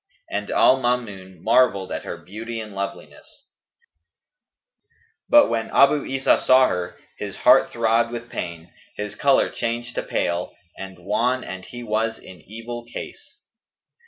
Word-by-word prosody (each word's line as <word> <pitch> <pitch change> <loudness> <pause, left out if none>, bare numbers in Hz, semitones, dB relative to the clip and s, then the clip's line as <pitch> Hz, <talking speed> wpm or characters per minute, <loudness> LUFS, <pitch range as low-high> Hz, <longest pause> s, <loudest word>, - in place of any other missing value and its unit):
And 105 0 -3
Al 130 - +5
Maamun 105 -8 -3
marvelled 115 -5 +3
at - - -3
her - - -5
beauty 110 +7 -7
and 110 -2 -8
loveliness; 100 0 -8 1.8
but, 295 0 +7
when 115 -1 -2
Abu 140 +1 +4
Isa 135 0 +2
saw 130 0 +6
her, 90 -1 -3 0.2
his - - -5
heart - - +6
throbbed 115 0 +1
with 120 -1 -6
pain, 85 -5 -7 0.2
his 105 0 -5
colour 140 -1 +2
changed 120 +1 -3
to - - -2
pale 85 +1 -2 0.2
and 95 -1 -9
wan 120 +8 0
and 95 0 -7
he 120 0 -9
was 110 0 -1
in 90 -3 -14
evil 115 +5 -8
case. - - -9
115 Hz, 140 wpm, -23 LUFS, 95-120 Hz, 1.8 s, but